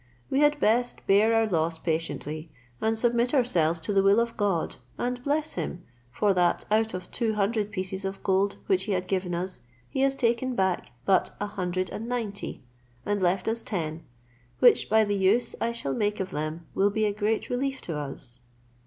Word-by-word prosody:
We 270 - +2
had 295 0 +4
best 245 +2 +1
bear 205 +3 +5
our 225 0 +4
loss 165 -4 0
patiently, 160 -1 -3 0.3
and 220 0 +1
submit 240 +3 +2
ourselves 170 - +2
to 185 +6 -2
the 195 - +5
will 200 +3 +5
of 235 0 -1
God, 195 -6 0 0.2
and 245 0 -2
bless 300 +2 0
him, 175 0 -4 0.3
for 205 +9 +2
that 180 -1 +2
out 220 -1 +2
of 185 - -7
two 225 -3 0
hundred 210 +1 0
pieces 190 -1 -4
of 195 0 -5
gold 195 +1 +2
which 190 0 +1
he 210 - -1
had 185 0 -1
given 185 -2 -1
us, 185 +2 -3 0.3
he 265 - -4
has 275 0 +3
taken 245 0 +1
back 190 -3 0
but 190 -2 +2
a 205 - -1
hundred 185 -3 -2
and 225 +2 -5
ninety, 225 - -4 0.4
and 205 -1 0
left 180 +1 +1
us 225 +1 0
ten, 165 -5 -4 0.5
which, - - +5
by 220 +1 +5
the 205 -1 0
use 200 +5 +2
I 230 - +1
shall 185 -13 -3
make 210 +6 0
of 190 -1 -3
them 155 +2 -4
will 200 +1 +3
be 215 +1 0
a 205 - +1
great 210 +1 -1
relief 265 +2 -1
to 165 - -5
us." 135 -4 -4
200 Hz, 195 wpm, -27 LUFS, 180-230 Hz, 0.5 s, bear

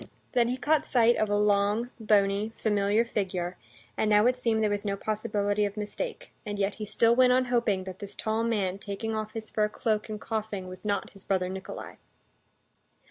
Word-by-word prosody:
Then 240 -2 +3
he 250 +2 -1
caught 305 +3 +1
sight 235 -2 +4
of 215 - +1
a 205 - +2
long, 205 +3 +2
bony, 205 0 +2
familiar 210 +1 +2
figure, 185 -5 -2 0.4
and 215 - +1
now 210 +1 +5
it 250 +1 +4
seemed 230 -3 +1
there 210 - +3
was 205 0 -1
no 200 -1 -1
possibility 210 0 0
of 205 0 -2
mistake; 485 - -5
and 205 -2 -4
yet 200 0 0
he 215 - -6
still 230 +3 +3
went 250 0 +6
on 255 0 +3
hoping 235 -6 +1
that 185 0 -8
this 200 -1 -8
tall 220 +1 -1
man 200 -5 0
taking 205 +2 -4
off 215 0 -4
his 220 -1 -6
fur 210 -1 +1
cloak 215 0 -1
and 215 -1 -4
coughing 215 -4 -4
was 185 0 -10
not 205 -2 -1
his 195 -1 -15
brother 185 -2 0
Nikolay. 190 0 -7
210 Hz, 195 wpm, -28 LUFS, 200-225 Hz, 0.4 s, went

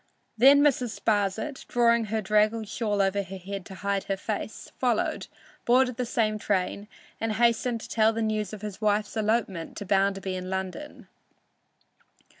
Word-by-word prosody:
Then 275 +5 +7
Mrs. 250 -5 +1
Sparsit, 215 +6 -1
drawing 235 -1 +3
her 215 +1 -2
draggled 215 +2 +2
shawl 210 -2 0
over 195 +1 +1
her 190 0 -8
head 195 0 -7
to 190 - -9
hide 200 0 -2
her 195 - -2
face, - - -5
followed, - - 0 0.4
boarded 250 0 +3
the 250 - -2
same 215 -2 0
train, 200 0 -1 0.3
and 225 -1 -1
hastened 235 +1 +1
to - - -8
tell 220 -1 +3
the 225 0 -2
news 215 -2 -1
of 215 -1 -9
his 210 0 -6
wife's 210 0 +1
elopement 215 -6 -1
to 205 - -5
Bounderby 195 0 +1
in 185 0 -5
London. 190 +10 -5
215 Hz, 160 wpm, -27 LUFS, 195-230 Hz, 0.4 s, Then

